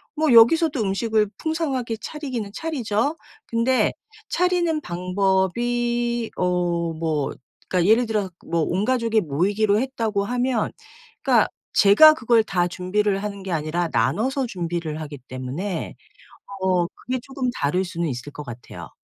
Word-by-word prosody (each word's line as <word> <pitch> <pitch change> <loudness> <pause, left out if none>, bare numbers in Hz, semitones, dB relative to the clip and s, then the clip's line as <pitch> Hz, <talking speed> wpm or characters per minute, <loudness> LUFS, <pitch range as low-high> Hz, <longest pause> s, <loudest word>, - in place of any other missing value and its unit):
뭐 310 -4 +2
여기서도 285 +4 +6
음식을 210 +1 +1
풍성하게 275 -8 -2
차리기는 255 -9 -5
차리죠. 280 -1 -1 0.3
근데 235 +3 +2 0.4
차리는 350 -3 +1
방법이 230 +6 0
어 175 -2 0
뭐 155 -3 -1 0.4
그러니까 180 +1 +2
예를 240 +2 +4
들어 210 -4 -1 0.2
뭐 170 0 0
온 185 +6 0
가족이 230 -3 +2
모이기로 200 +7 +1
했다고 225 -5 -1
하면 245 +1 0 0.5
그러니까 - - +4 0.3
제가 215 +10 +8
그걸 235 -6 +3
다 180 -4 0
준비를 195 +3 -1
하는 200 -2 -5
게 190 - -5
아니라 165 +2 -1
나눠서 260 +4 +1
준비를 170 -6 -4
하기 150 -2 -7
때문에 140 +9 -4 0.7
어 185 -2 +2
그게 255 +8 -5
쪼금 265 -1 -3
다를 160 +6 0
수는 170 -2 -3
있을 130 +1 -5
것 150 - -8
같아요. 120 -2 -9
210 Hz, 300 characters per minute, -23 LUFS, 175-245 Hz, 0.7 s, 제가